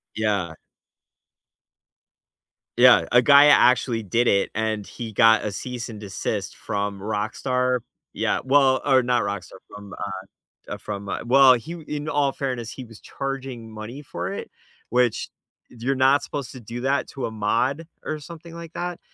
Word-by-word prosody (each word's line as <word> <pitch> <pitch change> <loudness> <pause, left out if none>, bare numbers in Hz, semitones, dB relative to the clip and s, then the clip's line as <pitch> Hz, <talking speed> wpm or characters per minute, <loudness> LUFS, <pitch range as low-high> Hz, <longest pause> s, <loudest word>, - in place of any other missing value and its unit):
Yeah. 100 -6 -1 2.2
Yeah, 125 0 +7
a 125 0 +6
guy 140 +2 +7
actually 125 -4 +4
did 115 +5 +1
it, 100 0 +2
and 110 -2 -2
he 115 -3 -7
got 110 +1 +5
a 105 - -2
cease 120 +3 -6
and 110 - -8
desist 100 -2 -4
from 100 -1 -3
Rockstar 125 +5 -1 0.3
Yeah, - - 0
well, 135 -1 +4
or 130 -3 +4
not 125 -1 +2
Rockstar, 100 -2 -5
from, 100 -1 -10 0.5
uh - - -18
uh, - - -5
from, 100 -1 -6
uh 95 - -2
well, 130 +1 +7
he 140 +8 -6
w 165 -3 -10
in 150 0 -4
all 145 -2 +1
fairness, 125 -5 -4
he 130 - -8
was 115 -2 -14
charging 135 -4 -6
money 110 +6 -8
for 140 - -5
it, - - -6 0.4
which 125 -1 +1 0.4
you're 125 +3 -2
not 135 +2 +4
supposed 140 -4 -5
to 130 - -10
do 120 +2 -7
that 140 +2 0
to 135 - -5
a 115 - -4
mod 125 +9 -1 0.2
or 155 - -4
something 165 +2 -11
like 170 -1 -9
that. 175 -1 -4
125 Hz, 165 wpm, -23 LUFS, 110-135 Hz, 2.2 s, Yeah